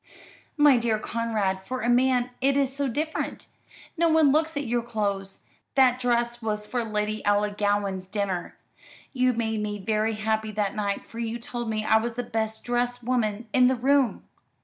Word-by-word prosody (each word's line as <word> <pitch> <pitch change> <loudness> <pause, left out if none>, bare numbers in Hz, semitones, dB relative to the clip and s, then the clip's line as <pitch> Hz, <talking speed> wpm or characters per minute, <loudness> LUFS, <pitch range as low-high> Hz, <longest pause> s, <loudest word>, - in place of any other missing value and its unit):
"My 295 -3 +6
dear 230 -2 +1
Conrad, 215 -4 -2
for 255 +5 -4
a - - -1
man 250 0 +3
it 275 +1 +3
is 270 -1 +1
so 280 0 0
different. 305 +6 -3 0.5
No 335 0 +3
one 315 -3 +5
looks 315 +1 +1
at 285 - -2
your 240 0 0
clothes. 200 -4 -3 0.3
That 255 -2 +5
dress 240 -1 0
was 210 -1 -2
for 240 +2 -2
Lady 215 -1 -2
Ellangowan's 205 -2 0
dinner. 195 -3 -3 0.6
You 255 -1 +2
made 220 -2 -1
me 210 0 -3
very 215 +2 0
happy 220 0 -1
that 205 -1 -1
night, 200 -2 -2
for 230 - -10
you 230 0 -2
told 240 0 -5
me 215 -1 -2
I 220 - +5
was 230 +1 -2
the 245 - -2
best 220 -1 -3
dressed 245 0 -1
woman 230 -2 -1
in 250 -1 +6
the 260 - +2
room." 270 +1 +2
230 Hz, 175 wpm, -26 LUFS, 210-250 Hz, 0.6 s, My